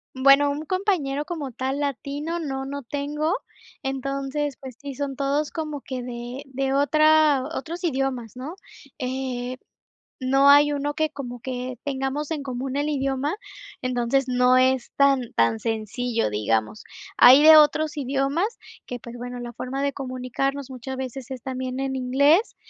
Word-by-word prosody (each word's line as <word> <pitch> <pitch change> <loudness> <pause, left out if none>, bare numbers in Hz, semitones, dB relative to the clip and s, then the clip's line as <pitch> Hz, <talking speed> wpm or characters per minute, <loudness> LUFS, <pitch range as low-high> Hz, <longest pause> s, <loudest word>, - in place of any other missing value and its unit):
Bueno, 275 +2 +5
un 290 +2 -4
compañero, 330 -7 0
como 300 -6 -5
tal, 265 +4 -3
latino, 290 +4 -3
no, 270 -4 -3
no 280 +1 -5
tengo. 295 +5 -2 0.5
Entonces, 275 +1 -3
pues 260 -3 -9
sí, 280 -1 -6
son 275 0 -4
todos 285 +2 0
como 305 -4 -5
que 255 -2 -5
de 245 +2 -6
de 270 0 -2
otra 305 -1 +4
otros 335 +6 -5
idiomas, 265 - -2
¿no? 270 +7 -6 0.5
Eh, 255 -1 -3 0.6
no 270 +1 +4
hay 290 +1 +7
uno, 290 +1 -2
que 310 0 0
como 245 -4 -7
que 250 0 -5
tengamos 275 +2 -2
en 300 -3 -3
común 260 0 -4
el 290 +1 0
idioma. 275 +3 -1 0.4
Entonces, 255 +1 +1
no 250 0 +4
es 255 -1 +2
tan 275 -4 +3
tan 115 -1 +2
sencillo, 225 - -1
digamos. 110 - -1 0.3
Hay 255 +3 +9
de 315 0 +10
otros 305 0 +4
idiomas 280 - -1 0.3
que, 245 - -5
pues, 235 +1 -10
bueno, 245 +1 -6
la 240 0 -6
forma 270 +4 -4
de 280 - 0
comunicarnos, 270 +1 -3
muchas 260 +1 -6
veces 260 0 -6
es 260 -2 -6
también 260 -1 -4
en 270 0 -2
inglés. 280 - +3
270 Hz, 155 wpm, -24 LUFS, 255-290 Hz, 0.6 s, de